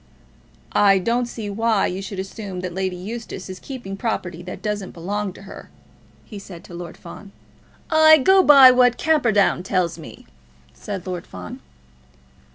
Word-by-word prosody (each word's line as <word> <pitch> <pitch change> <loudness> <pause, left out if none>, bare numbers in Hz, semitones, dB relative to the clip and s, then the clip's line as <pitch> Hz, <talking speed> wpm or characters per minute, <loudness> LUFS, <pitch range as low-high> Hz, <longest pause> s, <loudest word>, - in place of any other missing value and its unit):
"I 200 -1 +4
don't 235 +6 0
see 225 -3 -7
why 220 0 +1
you 185 +2 -3
should 195 0 -7
assume 190 -1 -6
that 180 -1 -5
Lady 190 0 -2
Eustace 195 0 -7
is 185 - -9
keeping 245 -8 -8
property 185 -5 -4
that 180 +1 -9
doesn't 210 -3 -4
belong 200 +4 -3
to 195 - -14
her," 195 - -12 0.6
he 210 - -9
said 180 -3 -11
to - - -13
Lord 175 -1 -8
Fawn. 195 +3 -12 0.6
"I 315 0 +7
go 380 +7 +5
by 275 -6 +8
what 250 -1 +3
Camperdown 230 - +2
tells 180 -3 -1
me," 160 - -12 0.5
said 195 -4 -7
Lord 180 -2 -6
Fawn. 90 -1 -9
195 Hz, 160 wpm, -21 LUFS, 185-230 Hz, 0.6 s, by